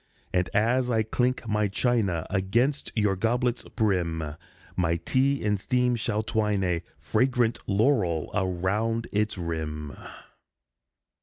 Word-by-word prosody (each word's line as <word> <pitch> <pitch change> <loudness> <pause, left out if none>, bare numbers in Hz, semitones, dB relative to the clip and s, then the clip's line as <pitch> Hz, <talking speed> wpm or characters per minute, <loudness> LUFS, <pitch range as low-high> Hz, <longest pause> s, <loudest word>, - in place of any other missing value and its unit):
And, 90 -1 +1
as 125 +4 +2
I 110 -2 +2
clink 125 +2 0
my 105 -1 +1
china 100 -5 0
Against 115 +9 +1
your 105 -3 +2
goblet's 120 +4 0
brim, 85 -8 -1 0.4
My 85 -2 +1
tea 135 +10 +1
in 105 -1 +2
steam 125 +4 +1
shall 110 -2 -1
twine 105 -3 0
a 90 -2 0 0.2
Fragrant 120 - +1
laurel 100 - +2
round 100 +5 0
its 105 0 0
rim. 80 -3 -4
105 Hz, 120 wpm, -27 LUFS, 90-120 Hz, 0.4 s, as